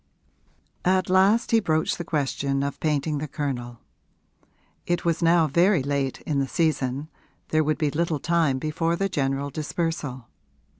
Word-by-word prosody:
III 185 - +3
At 185 -1 0
last 195 +5 +4
he 230 - +5
broached 160 -6 0
the - - -2
question 140 -3 -1
of 140 0 -4
painting 150 -1 0
the 155 - -4
Colonel: 125 -5 -4 1.1
it 175 0 -1
was 170 0 +1
now 170 0 +4
very 170 +2 +3
late 140 -1 -2
in 145 -3 -1
the 135 - 0
season 145 -3 0 0.4
there 155 0 +2
would 155 0 0
be 150 -2 0
little 165 -1 -1
time 165 -5 +1
before 160 +4 -1
the 195 +3 0
general 140 -3 -1
dispersal. 150 -5 -3
155 Hz, 155 wpm, -25 LUFS, 140-170 Hz, 1.1 s, he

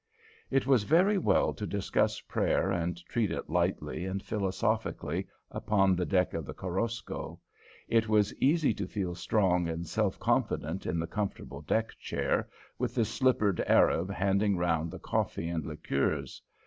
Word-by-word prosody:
It 135 - +2
was 130 -4 +4
very 185 - +4
well - - +2
to - - -5
discuss - - 0
prayer 95 - 0
and 85 -2 -1
treat 110 +2 0
it - - -4
lightly - - 0
and 95 +1 -3
philosophically 110 +2 -1 0.2
upon 95 -3 +2
the 90 0 -1
deck 90 -3 +2
of 80 - -3
the - - -8
Korosko. 105 +6 -4 0.5
It 115 -1 +2
was 105 -1 +3
easy 145 -2 +3
to 100 -2 -4
feel 95 -3 -3
strong 90 -1 +1
and 85 +1 -3
self - - 0
confident 80 +5 0
in 85 - -1
the 85 - -1
comfortable 95 -7 -4
deck 110 +9 0
chair, - - -1 0.3
with - - -2
the 115 - +3
slippered 110 -6 +1
Arab 90 +4 +4
handing 100 0 +1
round 85 -2 0
the - - -7
coffee 85 - -2
and 80 -3 -2
liqueurs. 70 0 -2
95 Hz, 155 wpm, -30 LUFS, 85-110 Hz, 0.5 s, was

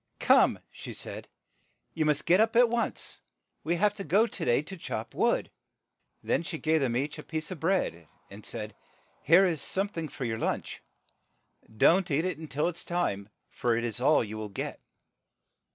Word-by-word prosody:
"Come," - - +5
she - - -9
said, - - -6 0.7
"you 155 - 0
must 150 -1 +1
get 180 +3 +5
up 225 +1 +2
at 240 0 +6
once. 235 0 -2 0.4
We 170 +2 0
have 205 +4 +2
to 195 - -4
go 205 +5 +4
to - - -5
day 120 +4 +3
to 190 +5 -8
chop 170 - -5
wood." - - +1 0.7
Then - - +1
she 170 -1 -5
gave 160 0 +1
them 120 -3 +1
each 145 +4 -3
a - - -7
piece 160 +2 -5
of 180 - -6
bread, 160 - 0 0.2
and 100 +2 -12
said, 105 -2 -5 0.5
"Tnere 175 +5 +7
is 160 -5 -1
some 195 +7 0
thing 165 -6 -4
for 135 - -6
your 110 -1 -2
lunch. - - -3 1.0
Don't 180 - +4
eat 155 +3 +1
it 160 -4 -4
till 150 +4 0
it 175 -1 -3
is - - -6
time, 105 - -2 0.2
for 120 -2 0
it 120 - -1
is 120 0 -2
all 145 +1 +4
you 110 0 -6
will 105 -1 -5
get." 100 - -5
155 Hz, 190 wpm, -29 LUFS, 120-185 Hz, 1.0 s, Tnere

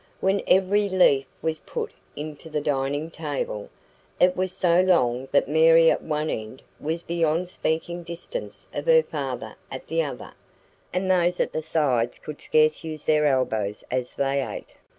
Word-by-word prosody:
When 195 +1 +1
every 200 +2 +3
leaf 145 -8 +4 0.2
was 160 -1 -1
put - - -5 0.2
into 150 +2 -7
the 155 -1 -1
dining 145 +2 -1
table, 145 -10 -4 0.5
it 180 0 +4
was 185 0 -1
so 180 -2 +3
long 130 -9 +2
that 140 - +3
Mary 165 +2 +6
at - - 0
one 155 0 -2
end 110 +4 -6 0.2
was 165 +3 -3
beyond 170 +1 0
speaking 170 0 -2
distance 170 - -7
of - - -4
her 485 -1 +6
father - - -4 0.2
at - - -7
the - - +1
other, - - -6 0.6
and 185 +1 -1
those 180 -1 +2
at - - 0
the 155 - -1
sides 135 -7 0
could 150 - -9
scarce 155 0 +2
use 155 -2 -6
their 150 -1 +3
elbows 110 -7 0
as 125 -1 -1
they 140 0 +1
ate. - - -7
155 Hz, 165 wpm, -25 LUFS, 140-175 Hz, 0.6 s, Mary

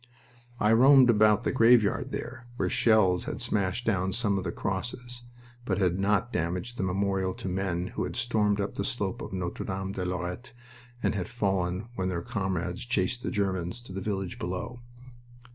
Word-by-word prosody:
I 105 - +3
roamed 130 +1 +7
about 105 0 +4
a - - +2
graveyard 120 +1 +4
there, 130 -1 -6
where - - 0
shells 95 -6 +3
had - - -4
smashed 100 +3 -1
down 95 -3 +1
some 110 -4 +2
of 95 - -1
the 85 - -2
crosses, 120 +7 -4 0.4
but - - -1
had 90 -2 +1
not 105 +5 +1
damaged 90 +6 -2
the - - -2
memorial 95 0 0
to - - -6
the 90 - -2
men 90 -2 -1
who - - -3
had - - -6
stormed 110 -4 +1
up 100 - -2
the - - -3
slope 100 -7 -2
of - - -6
Notre 90 -2 -3
Dame 95 0 -3
de 95 -2 -4
Lorette 90 +6 -4 0.5
and - - +2
had 95 -4 -3
fallen 95 -2 -1
when 95 -5 -2
their 85 -2 -3
comrades 95 -3 -2
chased 120 0 -1
the - - -2
Germans 95 0 -1
to 120 - -11
the 95 - -4
village 95 -2 -3
below. 90 +7 -4
100 Hz, 185 wpm, -28 LUFS, 90-115 Hz, 0.5 s, roamed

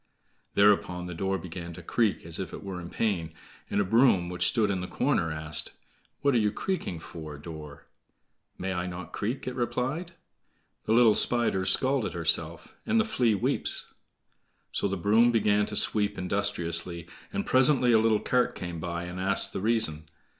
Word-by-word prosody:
Thereupon 100 -3 +3
the 90 - -6
door 95 +3 -1
began 85 -1 -7
to 85 - -10
creak 110 +1 0
as 85 0 -5
if 95 - -5
it - - -8
were 95 -3 -6
in 85 - -8
pain; 85 -8 -2 0.3
and - - 0
a - - +3
broom, 100 -4 +3
which 90 0 +1
stood 110 -4 +2
in 95 -2 -2
the 90 - -5
corner, 80 -2 0
asked, 75 0 0 0.5
"What 140 -1 +2
are 120 - +4
you 105 -1 +1
creaking 145 - -3
for, 80 -3 -9
door?" 75 -1 -10 0.7
"May 95 +1 -3
I 90 0 -3
not 90 -1 -7
creak?" 115 +6 -3
it 130 - -2
replied: 130 +8 -2 0.7
"The 110 - +1
little 115 -2 +6
Spider's 105 -6 +2
scalt 130 0 +2
herself, 80 0 +1
And 225 0 +1
the 220 - +2
Flea 125 - +1
weeps." 100 - 0 0.8
So - - 0
the 100 0 -2
broom 110 +6 +4
began 105 -2 +2
to 105 - -5
sweep 105 -1 +1
industriously, 90 -3 -2 0.3
and 200 0 -3
presently 130 -1 +4
a 110 - +5
little 110 -1 +3
cart 125 +3 +1
came 85 -2 -6
by, 85 +1 -4
and 90 +1 -7
asked 95 +1 +2
the - - -3
reason. 80 -9 0
95 Hz, 175 wpm, -28 LUFS, 85-115 Hz, 0.8 s, little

